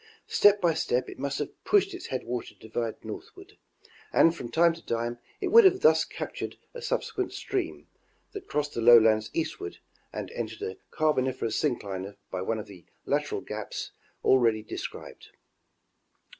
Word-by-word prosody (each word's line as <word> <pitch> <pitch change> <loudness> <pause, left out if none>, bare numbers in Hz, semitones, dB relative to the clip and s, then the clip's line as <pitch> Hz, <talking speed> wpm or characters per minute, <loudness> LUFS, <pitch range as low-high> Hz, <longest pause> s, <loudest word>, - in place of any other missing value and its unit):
Step 205 0 +5
by 175 -4 +3
step 125 -4 0
it - - -10
must 140 0 -2
have 150 - -6
pushed 395 -1 +3
its 360 - -7
headwater 125 -2 -4
divide 110 0 -5
northward, - - -10 0.5
and 165 - +5
from 120 - -6
time 170 +3 +4
to 165 - -13
time 120 +1 -2 0.2
it 385 - -1
would 460 +4 +9
have 380 -1 +5
thus 470 - +5
captured - - -6 0.2
a 480 - -7
subsequent 455 -5 -2
stream, 385 -4 -3 0.4
that 405 - -8
crossed 145 0 -1
the 115 - -2
lowlands 110 -2 +6
eastward, 155 - -3 0.3
and - - -5
entered 115 -1 -5
a 95 0 -4
Carboniferous 130 -7 0
syncline 100 -8 -2 0.2
by 90 - -3
one 110 +4 -1
of 105 - -5
the 95 -4 -13 0.2
lateral - - 0
gaps - - -5 0.3
ah 130 -1 +5
eady 110 -1 0
described. - - -7
130 Hz, 155 wpm, -28 LUFS, -, 0.5 s, would